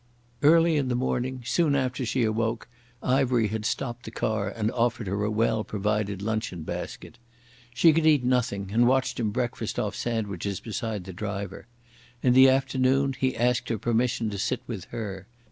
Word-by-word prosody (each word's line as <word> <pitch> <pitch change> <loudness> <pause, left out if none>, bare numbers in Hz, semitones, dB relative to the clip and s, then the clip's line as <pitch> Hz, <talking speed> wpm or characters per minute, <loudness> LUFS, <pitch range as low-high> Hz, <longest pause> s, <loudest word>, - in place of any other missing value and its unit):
Early 165 +1 +5
in 140 -3 0
the 125 - 0
morning, 130 0 -2
soon 155 +1 +2
after 130 -2 -1
she 125 +2 +1
awoke, 115 +1 -1 0.4
Ivery 125 -4 +2
had 110 0 -3
stopped 120 0 -3
the - - -5
car 110 -2 -1
and 110 -1 -2
offered 120 -2 0
her 100 +2 -2
a 105 - 0
well 110 0 +1
provided 105 -1 -2
luncheon 110 -6 -2
basket. - - -7 0.6
She 160 +4 +6
could 160 0 +2
eat 150 -5 +5
nothing, 115 -6 0
and 120 +2 +4
watched 130 0 +1
him 110 -3 0
breakfast 120 +3 -3
off - - -1
sandwiches 100 -5 -3
beside 110 -3 -4
the 95 +1 -8
driver. 100 +1 -5 0.6
In 125 - +4
the 130 +1 +8
afternoon 135 +1 +2
he 130 +1 -1
asked 120 +1 +1
her 115 - 0
permission 115 +1 0
to 100 - -5
sit 125 +5 -1
with 105 -7 -6
her. 100 -4 -6
115 Hz, 175 wpm, -26 LUFS, 105-130 Hz, 0.6 s, the